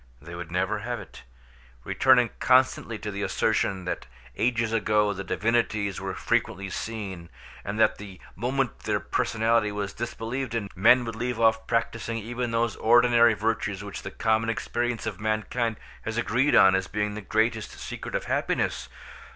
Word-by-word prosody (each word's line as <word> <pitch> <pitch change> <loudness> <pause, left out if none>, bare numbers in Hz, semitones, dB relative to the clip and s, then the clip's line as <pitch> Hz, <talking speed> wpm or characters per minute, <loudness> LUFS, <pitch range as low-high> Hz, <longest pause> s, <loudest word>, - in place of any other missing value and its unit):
They 85 +4 -11
would 85 -1 -7
never 100 +4 0
have 120 +3 -4
it; 95 - -12 0.6
returning 125 -3 +4
constantly 130 -3 +3
to 105 0 -5
the 100 0 -5
assertion 95 -1 0
that 90 - -4 0.3
ages 115 -2 0
ago 105 -2 +2
the 100 0 -5
divinities 110 -1 0
were - - -4
frequently 100 0 -1
seen, 95 -7 -5 0.3
and 100 +2 -4
that 110 - +3
the 100 -3 -10 0.2
moment 125 +4 -1
their - - -1
personality 115 -1 +1
was 100 -1 -4
disbelieved 120 +1 -4
in, 100 -4 -3
men 120 +6 +5
would 115 -1 -5
leave 120 0 -3
off 110 -1 +3
practising 115 0 -1
even 120 +2 -3
those 115 -1 0
ordinary 120 0 +5
virtues 105 -2 -1
which 100 -1 -7
the - - -6
common 110 +2 +1
experience 120 +1 -2
of 105 -4 -4
mankind 110 +2 -1 0.3
has 110 +1 -4
agreed 125 +5 +2
on 95 - +7
as 95 0 0
being 105 0 -2
the 110 - -6
greatest 110 +1 0
secret - - -6
of - - -1
happiness. - - -1
110 Hz, 160 wpm, -26 LUFS, 100-115 Hz, 0.6 s, on